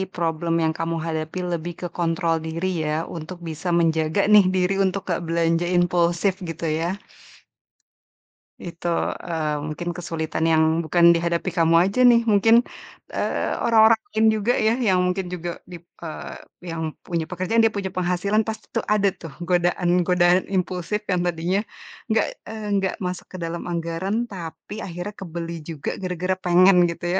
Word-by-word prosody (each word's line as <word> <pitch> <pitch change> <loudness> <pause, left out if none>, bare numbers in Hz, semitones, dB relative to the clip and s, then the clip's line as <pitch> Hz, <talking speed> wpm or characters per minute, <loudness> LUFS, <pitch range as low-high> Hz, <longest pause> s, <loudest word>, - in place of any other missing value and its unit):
problem 165 0 -1
yang 160 - +2
kamu 165 0 -1
hadapi 160 +2 -3
lebih 170 +1 -4
ke - - -1
kontrol 165 0 +1
diri 165 +3 -2 0.2
ya, 150 - 0 0.2
untuk 165 +3 -7
bisa 160 +3 -6
menjaga 160 +2 +1
nih 205 -2 +8
diri 185 +1 +1
untuk 190 +1 -1
nggak 170 -2 -1
belanja 165 +1 +1
impulsif 175 +1 +2 0.2
gitu 165 +1 -5
ya? 170 +2 -1 1.7
Itu, 175 0 -5 0.3
eee, 160 -3 -2
mungkin 155 +3 -4
kesulitan 165 -2 -4
yang 160 +1 +3
bukan 170 +1 +5
dihadapi 170 +1 -1
kamu 165 -2 +3
aja 195 +8 +2
nih. 240 -2 +6
Mungkin, 225 +2 +5 0.5
eee, - - -1
orang-orang 220 -1 +5 0.2
lain 220 - +4
juga 220 +3 +1
ya 220 +1 +3
yang 190 -5 +3
mungkin 180 0 -1
juga 175 -1 -5
dip 175 -2 -10 0.2
eee, 160 -2 -7 0.4
yang 160 -1 -2 0.2
punya 165 -2 -3
pekerjaan 185 +6 +1
dia 225 - +5
punya 200 -3 -4
penghasilan 185 +4 +1
pasti 220 0 -5
tuh - - 0
ada 205 -2 +3
tuh 165 - -10 0.2
godaan-godaan 175 +1 +2
impulsif 185 +2 -2
yang 180 -2 0
tadinya 175 +3 0 0.5
nggak, 220 0 +2 0.2
eee, 220 -1 -6
nggak 190 - -1
masuk 180 -1 -5
ke 185 - -8
dalam 170 0 -4
anggaran, 175 +7 -2
tapi 195 +1 -8
akhirnya 180 +3 -6
kebeli 170 -3 -6
juga 150 -2 -5
gara-gara 185 0 -1
pengen 180 -1 +5
gitu 170 +1 -6
175 Hz, 150 wpm, -23 LUFS, 165-190 Hz, 1.7 s, nih